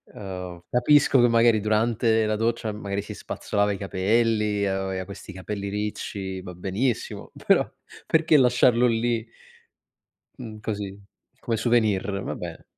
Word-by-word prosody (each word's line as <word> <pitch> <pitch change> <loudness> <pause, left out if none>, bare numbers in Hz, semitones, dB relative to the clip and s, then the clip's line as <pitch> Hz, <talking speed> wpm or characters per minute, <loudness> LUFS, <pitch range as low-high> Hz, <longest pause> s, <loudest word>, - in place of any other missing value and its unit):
ehm, 90 -3 -7
capisco 135 +2 +4
che 120 - +6
magari 115 -1 +4
durante 110 +1 +2
la 110 0 0
doccia, 115 0 -1
magari 100 -1 -4
si - - -8
spazzolava 105 0 -1
i - - -4
capelli, 105 +1 +1
aveva 95 -1 -2
questi 100 0 -10
capelli 100 +2 -5
ricci, 100 -2 -4
va 90 -1 -8
benissimo, 100 +7 -2
però - - +4 0.4
perché 160 -1 +4
lasciarlo 125 -1 +4
lì? 115 0 0 1.1
Mhmm, 110 -2 -8
così, 100 -2 -4 0.4
come 115 - -2
souvenir, 105 -4 +1
va - - -4
beh. - - -8
105 Hz, 130 wpm, -25 LUFS, 100-115 Hz, 1.1 s, che